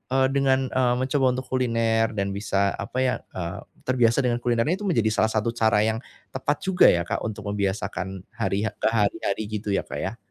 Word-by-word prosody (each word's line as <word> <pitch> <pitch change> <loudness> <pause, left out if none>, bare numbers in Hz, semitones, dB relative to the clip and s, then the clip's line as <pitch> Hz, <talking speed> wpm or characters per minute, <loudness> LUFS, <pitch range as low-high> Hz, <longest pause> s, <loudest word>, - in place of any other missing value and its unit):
eee, 130 0 +4
dengan, 135 -1 +2
eee, 125 -1 +2
mencoba 130 +2 +1
untuk 130 - -4
kuliner 115 -2 +1
dan 100 -1 -1
bisa 100 0 0
apa 100 +5 -6
ya, 130 - +2 0.2
eee, 85 -1 -4 0.3
terbiasa 120 -3 +3
dengan 120 -1 0
kulinernya 120 +6 +1
itu 205 - -2
menjadi 115 - +2
salah 110 - +2
satu 110 +1 0
cara 110 -3 +2
yang 110 +1 -1 0.3
tepat 140 +2 -1
juga 190 -1 +4
ya 85 -1 +2
Kak - - -2
untuk 110 -1 -5
membiasakan 95 -2 -3
hari 100 -1 -1 0.2
ke - - +3
hari-hari 105 -2 0
gitu 105 0 -4
ya 100 - 0
Kak - - -6
ya. 100 +5 -4
115 Hz, 190 wpm, -25 LUFS, 100-130 Hz, 0.3 s, eee